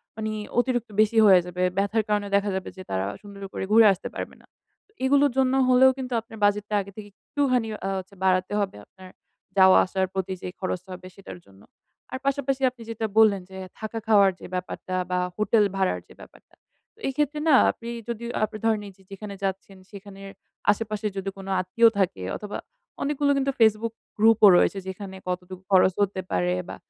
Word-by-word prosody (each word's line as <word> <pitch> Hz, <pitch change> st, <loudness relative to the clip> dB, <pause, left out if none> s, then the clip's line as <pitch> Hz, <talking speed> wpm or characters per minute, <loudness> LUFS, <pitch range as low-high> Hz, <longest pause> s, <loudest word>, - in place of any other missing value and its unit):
মানি 215 Hz, 0 st, -3 dB, 0.3 s
অতিরিক্ত 245 Hz, -2 st, 0 dB
বেশি 220 Hz, +1 st, +1 dB
হয়ে 190 Hz, -3 st, +7 dB
যাবে। 180 Hz, +1 st, -3 dB
ব্যথার 200 Hz, +3 st, +1 dB
কারণে 205 Hz, -1 st, 0 dB
দেখা 200 Hz, 0 st, +1 dB
যাবে 190 Hz, -, -4 dB
যে 185 Hz, -, -8 dB
তারা 95 Hz, 0 st, -1 dB, 0.2 s
সুন্দর 200 Hz, -1 st, -12 dB
করে -, -, -4 dB
ঘুরে 225 Hz, 0 st, +7 dB
আসতে 185 Hz, -, -7 dB
পারবে -, -, -6 dB
না। -, -, -24 dB, 0.4 s
তো -, -, -33 dB
এগুলোর 280 Hz, 0 st, +4 dB
জন্য 260 Hz, -1 st, +3 dB
হলেও 255 Hz, +1 st, +6 dB
কিন্তু 255 Hz, -1 st, -5 dB
আপনার 225 Hz, 0 st, -13 dB
বাজেটটা 210 Hz, +1 st, 0 dB
আগে 200 Hz, -, -10 dB
থেকে 210 Hz, -1 st, -9 dB
একটুখানি 255 Hz, -2 st, -1 dB, 0.2 s
আ -, -, -1 dB
হচ্ছে 190 Hz, +2 st, -12 dB
বাড়াতে 185 Hz, +1 st, +1 dB
হবে 195 Hz, -, -2 dB
আপনার 185 Hz, -1 st, -15 dB, 0.5 s
যাওয়া-আসার 190 Hz, 0 st, +5 dB
প্রতি 190 Hz, -1 st, -2 dB
যে -, -, -5 dB
খরচটা 185 Hz, 0 st, -4 dB
হবে 185 Hz, 0 st, -10 dB
সেইটার 195 Hz, -2 st, -10 dB
জন্য। 100 Hz, 0 st, -20 dB, 0.5 s
আর 260 Hz, -, -3 dB
পাশাপাশি 275 Hz, -1 st, 0 dB
আপনি 245 Hz, -2 st, -18 dB
যেটা 225 Hz, 0 st, -3 dB
বললেন 210 Hz, -3 st, +5 dB
যে, 190 Hz, -, -10 dB, 0.2 s
থাকা 220 Hz, +1 st, -5 dB
খাওয়ার 200 Hz, -3 st, +5 dB
যে -, -, -10 dB
ব্যাপারটা 185 Hz, 0 st, -5 dB, 0.2 s
বা 180 Hz, -, +1 dB, 0.2 s
হোটেল 215 Hz, +1 st, +3 dB
ভাড়ার 190 Hz, -1 st, 0 dB
যে -, -, -16 dB
ব্যাপারটা। -, -, -17 dB, 0.4 s
তো -, -, -27 dB
এইক্ষেত্রে 295 Hz, +2 st, -1 dB
না 275 Hz, -, +7 dB, 0.2 s
আপনি 235 Hz, -, -10 dB, 0.2 s
যদি 235 Hz, 0 st, -4 dB, 0.2 s
আপনি 215 Hz, 0 st, -2 dB
ধরেন 220 Hz, -2 st, +2 dB
এই -, -, -10 dB
যে -, -, -23 dB
যেখানে 200 Hz, +1 st, -7 dB
যাচ্ছেন 195 Hz, 0 st, -4 dB
সেখানের 195 Hz, -1 st, -11 dB, 0.4 s
আশেপাশে 215 Hz, 0 st, -3 dB
যদি 195 Hz, 0 st, -3 dB
কোনো 195 Hz, 0 st, -8 dB
আত্মীয় 230 Hz, +6 st, +4 dB
থাকে 135 Hz, -, 0 dB
অথবা 210 Hz, -1 st, -6 dB, 0.4 s
অনেকগুলো 285 Hz, 0 st, +1 dB
কিন্তু 275 Hz, 0 st, +1 dB
Facebook 220 Hz, +1 st, +3 dB, 0.2 s
গ্রুপ 220 Hz, +1 st, +5 dB
ও -, -, +11 dB
রয়েছে 195 Hz, -, +2 dB
যেইখানে 190 Hz, 0 st, -7 dB
কতটুকু 180 Hz, 0 st, -5 dB
খরচ 185 Hz, -1 st, +5 dB
হতে 190 Hz, -1 st, 0 dB
পারে 90 Hz, 0 st, +1 dB, 0.2 s
বা -, -, -6 dB
205 Hz, 185 wpm, -25 LUFS, 190-230 Hz, 0.5 s, ও